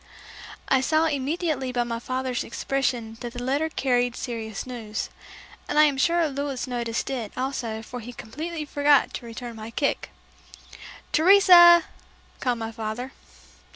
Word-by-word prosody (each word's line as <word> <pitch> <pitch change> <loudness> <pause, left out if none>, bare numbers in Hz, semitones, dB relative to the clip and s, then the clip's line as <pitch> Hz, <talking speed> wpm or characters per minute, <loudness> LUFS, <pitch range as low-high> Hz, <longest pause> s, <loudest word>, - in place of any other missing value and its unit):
I 265 - +3
saw 310 +4 +2
immediately 290 -2 -1
by 245 -1 0
my 230 -1 -4
father's 255 0 -2
expression 240 -3 -2
that 240 -1 -6
the 245 - -6
letter 285 +5 0
carried 245 -5 0
serious 225 -4 -5
news, 225 -4 -5 0.6
and - - -1
I 305 - +8
am 285 -3 +2
sure 340 +2 +3
Louis 280 -2 -3
noticed 235 -3 -3
it 235 -6 -4
also 240 -4 -3
for 245 +2 -7
he 240 +1 -8
completely 305 +8 -6
forgot 285 -1 +3
to 235 - -7
return 235 +1 -7
my 220 +1 -7
kick. 280 +5 -1 1.0
"Teresa!" 345 -1 +8 0.6
called 245 -2 0
my 225 0 -5
father. 225 +3 -5
255 Hz, 145 wpm, -25 LUFS, 235-290 Hz, 1.0 s, I